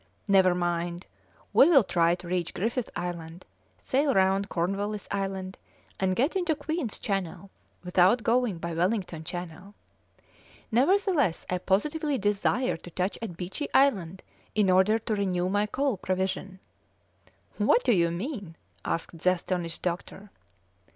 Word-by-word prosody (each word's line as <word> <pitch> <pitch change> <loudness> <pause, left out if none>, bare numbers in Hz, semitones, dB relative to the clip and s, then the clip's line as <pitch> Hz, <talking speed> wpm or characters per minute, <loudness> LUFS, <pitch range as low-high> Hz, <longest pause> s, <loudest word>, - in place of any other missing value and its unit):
Never 190 -3 +5
mind, 175 0 -2 0.5
we 285 - +7
will 280 -8 +7
try 170 -2 +2
to 175 0 -11
reach 175 -1 -2
Griffith 230 +4 -1
Island, 175 -1 -5 0.3
sail 275 +1 +1
round 195 +1 +2
Cornwallis 200 +4 -2
Island, 195 -1 -3 0.4
and 185 -1 +1
get 275 - +1
into 350 -4 +1
Queen's 290 -4 -3
Channel 195 -1 -4 0.3
without 185 +6 +3
going 235 -4 +1
by 170 0 -4
Wellington 175 -1 -1
Channel. 180 +4 -7 1.0
Nevertheless 290 - +2
I 180 - 0
positively 290 - 0
desire 210 +2 0
to 175 - -12
touch 185 +3 -2
at 190 -7 -6
Beechey 190 - -5
Island 190 -10 +2 0.3
in 205 -3 +3
order 190 +4 +4
to 225 -1 -2
renew 185 -3 0
my 205 +2 +1
coal 270 0 -1
provision." 190 +1 -2 1.0
"What - - +4
do - - +3
you 170 -3 +3
mean?" 195 - -5 0.3
asked 165 0 -3
the 185 +3 +3
astonished 175 -2 -4
doctor. 185 +3 -4
190 Hz, 135 wpm, -27 LUFS, 175-230 Hz, 1.0 s, we